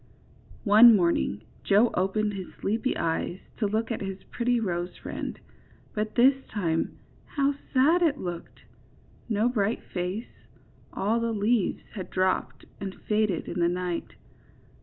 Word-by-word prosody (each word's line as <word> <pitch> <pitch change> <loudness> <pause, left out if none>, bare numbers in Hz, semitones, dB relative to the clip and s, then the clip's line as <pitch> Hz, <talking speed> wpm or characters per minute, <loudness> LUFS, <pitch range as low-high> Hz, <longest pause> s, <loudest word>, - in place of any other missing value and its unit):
31 215 +2 +8
One 230 - +9
morning 170 - +1 0.2
Joe 210 +4 +4
opened 205 +3 0
his 190 -2 -5
sleepy 225 +6 -1
eyes 165 +2 -1 0.2
to 215 - +1
look 220 +3 -1
at 230 - -3
his 195 -1 -5
pretty 245 0 +1
rose 175 -4 -3
friend, - - -6 0.5
but 215 0 -3
this 265 +2 +5
time 165 -6 -1 0.3
how 280 -1 +1 0.2
sad 305 +7 +4
it 310 -4 +3
looked! 175 -7 -6 0.7
No 215 +1 +2
bright 220 -3 0
face, 185 +5 -5
— - - -30
all 215 +4 0
the 230 0 -1
leaves 215 0 +1
had 190 -4 -6
drooped 185 0 -1
and 195 -1 -6
faded 210 -5 +1
in 180 - -4
the 170 0 +3
night. 180 -1 -3
210 Hz, 145 wpm, -27 LUFS, 185-235 Hz, 0.7 s, One